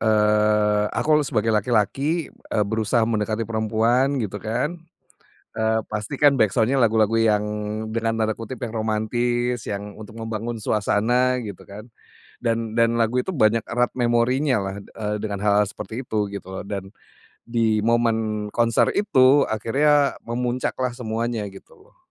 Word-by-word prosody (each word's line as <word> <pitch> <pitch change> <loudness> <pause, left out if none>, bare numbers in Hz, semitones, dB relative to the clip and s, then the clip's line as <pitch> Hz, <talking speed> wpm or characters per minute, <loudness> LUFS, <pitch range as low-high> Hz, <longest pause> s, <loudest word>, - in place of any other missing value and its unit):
eee, 105 -1 +3
aku 155 - 0
le - - -1
sebagai 115 0 +1
laki-laki, 125 - 0
eee, 105 - -2
berusaha 110 +2 +1
mendekati 110 0 -1
perempuan 115 +5 +1
gitu 105 -5 -3
kan, 125 +10 -2 0.7
eee, 110 0 +1
pastikan 135 +7 +1
backsound-nya 120 +2 +2
lagu-lagu 110 -1 +3
yang 105 -2 +3 0.5
dengan 115 0 -1
tanda 110 0 +1
kutip 115 +3 -7
"yang 115 - -7
romantis", 120 +3 -1
yang 100 0 -5
untuk 110 +1 -11
membangun 115 +1 -4
suasana, 115 +4 +1
gitu, 100 -3 -8
kan? 105 +2 -9 0.5
Dan 115 -1 -2
dan 115 0 +3
lagu 115 +3 +1
itu 185 +9 -1
banyak 115 -5 +2
erat 120 +1 0
memorinyalah, 120 -4 +1
eee, 105 -1 -4
dengan 105 -2 -4
hal-hal 105 0 +3
seperti 115 +4 -7
itu, 105 -4 -1
gitu 95 -1 -7
loh. - - -9
Dan, 100 -1 -6 0.5
di 115 -2 +1
momen 110 -2 0
konser 115 -1 +2
itu 140 -8 +4
akhirnya 140 +6 +2
memuncaklah 125 +1 -2
semuanya, 115 -2 -3
gitu, 95 0 -15 0.2
loh. - - -30
115 Hz, 140 wpm, -23 LUFS, 105-120 Hz, 0.7 s, itu